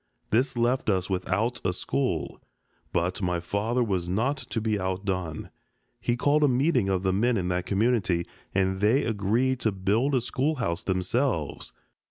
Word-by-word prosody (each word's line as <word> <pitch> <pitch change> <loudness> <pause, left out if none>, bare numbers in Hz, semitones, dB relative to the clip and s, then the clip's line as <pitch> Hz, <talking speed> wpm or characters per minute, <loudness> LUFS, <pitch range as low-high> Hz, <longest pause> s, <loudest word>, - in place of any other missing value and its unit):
This 125 +3 +2
left 120 +1 +1
us 95 -1 0
without 105 +6 -1
a 90 - +1
school. 90 - -2 0.5
But 90 +3 -1
my 90 -2 0
father 110 +8 0
was 95 -6 -1
not 115 +10 +1
to 120 - -4
be 110 -2 0
outdone. 95 -3 -3 0.5
He 120 +1 0
called 145 +4 +3
a - - +6
meeting 130 -4 +2
of 95 -1 0
the 95 -1 +2
men 115 +4 +2
in 90 -2 -1
that 90 0 -1
community, 100 -5 +1 0.3
and 95 0 0
they 115 +7 +4
agreed 115 +5 +1
to 110 - +1
build 105 +9 +1
a 125 - +2
schoolhouse 125 - -1
themselves. 95 - -1
105 Hz, 160 wpm, -27 LUFS, 95-125 Hz, 0.5 s, a